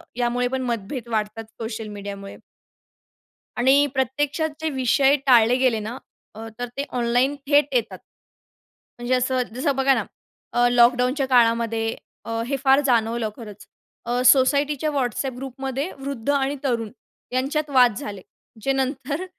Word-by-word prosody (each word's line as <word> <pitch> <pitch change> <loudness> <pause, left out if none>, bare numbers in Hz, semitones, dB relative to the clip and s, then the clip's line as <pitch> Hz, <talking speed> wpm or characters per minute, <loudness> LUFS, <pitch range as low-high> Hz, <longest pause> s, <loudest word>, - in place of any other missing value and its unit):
यामुळे 245 0 0
पण 265 0 -1
मतभेद 235 0 -4
वाढतात 215 0 -2 0.2
सोशल 225 -1 -5
मीडियामुळे. 200 -1 -8 1.2
आणि 270 +4 +4
प्रत्यक्षात 285 +4 -1
जे 320 - 0
विषय 270 0 +3
टाळले 240 -2 +5
गेले 255 -4 +2
ना 240 +3 -6 0.4
अ, 225 +1 -8
तर 245 - -3
ते 280 - -1
ऑनलाईन 245 +4 +1
थेट 290 0 +5
येतात. 235 -3 0 1.0
म्हणजे 240 +1 -1
असं 255 0 +1
जसं 275 +2 0
बघा 270 +1 +3
ना - - 0 0.5
अ, 245 0 +4
लॉकडाऊनच्या 250 +3 +3
काळामध्ये 230 -2 +2 0.3
अ, 230 0 -2
हे 275 +1 -1
फार 270 0 +5
जाणवलं 230 -3 +1
खरंच 210 -4 -11 0.4
अ, 245 +1 0
सोसायटीच्या 280 +3 +4
WhatsApp 260 -1 -2
ग्रुपमध्ये 270 +4 -4
वृद्ध 270 -2 -5
आणि 280 0 0
तरुण, 235 -5 -1 0.4
यांच्यात 290 +4 -1
वाद 250 -5 +4
झाले. 200 -2 -6 0.4
जे 270 - 0
नंतर 270 +5 -2
250 Hz, 135 wpm, -23 LUFS, 230-275 Hz, 1.2 s, टाळले